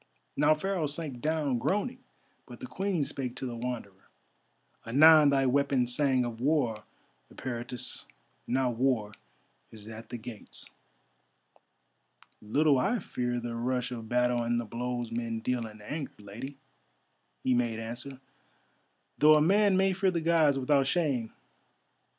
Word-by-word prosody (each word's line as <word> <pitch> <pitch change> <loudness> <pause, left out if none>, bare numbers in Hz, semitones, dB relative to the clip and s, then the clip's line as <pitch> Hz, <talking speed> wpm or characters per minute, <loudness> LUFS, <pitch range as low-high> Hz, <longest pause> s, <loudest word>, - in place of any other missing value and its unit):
Now 150 +1 +4
Pharaoh 180 -1 -1
sank 145 -4 -3
down 150 -5 0
groaning, 235 - -1 0.5
but - - -11
the - - -6
Queen 190 - -1
spake 130 -3 -4
to - - -5
the 120 -2 -4
Wanderer: 115 -5 -6 0.7
"Anon 150 +5 +7
thy 135 -1 +3
weapon 135 -1 +2
sang 130 0 +1
of 115 -1 -6
war, 125 -7 +1 0.5
Eperitus; 120 -1 -4 0.4
now 130 0 +1
war 120 -3 0 0.6
is 110 -1 -12
at 110 0 -9
the 120 - -5
gates." 110 -1 -8 1.7
"Little 140 +6 +3
I 215 - +1
fear 120 - -3
the 120 0 -5
rush 125 +1 -1
of 115 -3 -7
battle 125 0 +2
and 120 0 0
the 120 - -4
blows 120 +1 -4
men 115 -1 -3
deal 120 0 -2
in 105 -1 -13
anger, 145 +6 -5
Lady," 115 +7 -8 0.9
he 130 - +2
made 120 -2 +1
answer, 120 +4 -6 1.0
"though 155 +1 +7
a - - +5
man 195 +4 +4
may 190 0 +3
fear 190 +1 +2
the 175 -2 0
Gods 160 -4 +3
without 135 +1 +2
shame. 140 -8 0
125 Hz, 140 wpm, -29 LUFS, 120-150 Hz, 1.7 s, Anon